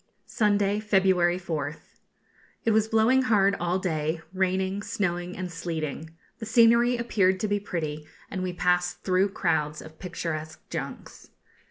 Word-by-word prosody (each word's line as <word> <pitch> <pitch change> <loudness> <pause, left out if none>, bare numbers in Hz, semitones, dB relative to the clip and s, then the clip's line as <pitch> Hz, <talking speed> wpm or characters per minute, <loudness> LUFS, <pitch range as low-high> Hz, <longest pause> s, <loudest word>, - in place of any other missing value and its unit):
Sunday, 205 -1 +1
February 190 -4 +3
4th. 155 -4 -5 0.7
It 225 - +3
was 220 0 +3
blowing 225 +4 +4
hard 200 -5 +3
all 175 +1 0
day, 160 -3 -1
raining, 190 +1 0
snowing, 175 -3 -2
and 180 -1 -4
sleeting. 160 -2 -4 0.3
The 225 - -6
scenery 235 +2 +5
appeared 195 -5 +2
to 215 - 0
be 205 0 0
pretty, 155 -6 -4 0.2
and 190 - -5
we 185 0 -2
passed 180 0 0
through 190 +1 +2
crowds 150 -5 0
of 155 0 -12
picturesque 155 -3 -5
junks. - - -7
185 Hz, 140 wpm, -26 LUFS, 170-205 Hz, 0.7 s, scenery